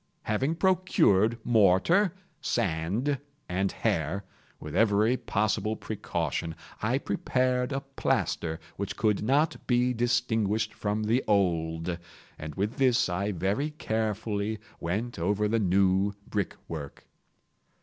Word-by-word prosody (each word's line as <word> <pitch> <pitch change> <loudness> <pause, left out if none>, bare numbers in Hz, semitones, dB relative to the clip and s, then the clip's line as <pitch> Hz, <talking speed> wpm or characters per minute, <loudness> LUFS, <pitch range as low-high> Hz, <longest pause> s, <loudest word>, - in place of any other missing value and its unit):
Having 135 +9 0
procured 160 - +3
mortar, 120 - +4 0.3
sand, 100 - 0 0.3
and 95 +2 0
hair, 95 -2 -1 0.4
with 75 - -7
every 110 +2 +4
possible 110 -2 0
precaution, 95 -6 -3 0.3
I - - +1
prepared 125 0 0
a 135 0 -1
plaster 85 -11 -1 0.2
which - - -4
could 105 -2 +2
not 140 +8 +1
be 125 0 +3
distinguished 110 -3 +1
from 105 +1 -2
the 115 +5 +2
old, 85 -4 +1 0.4
and 75 0 -6
with 105 +4 -2
this 130 -7 +3
I 100 +4 -1
very 100 - 0
carefully 110 - -2 0.2
went 105 +6 -3
over 100 +5 +1
the 115 +2 +1
new 95 0 +2
brickwork. 80 -7 -5
105 Hz, 110 wpm, -28 LUFS, 95-120 Hz, 0.4 s, mortar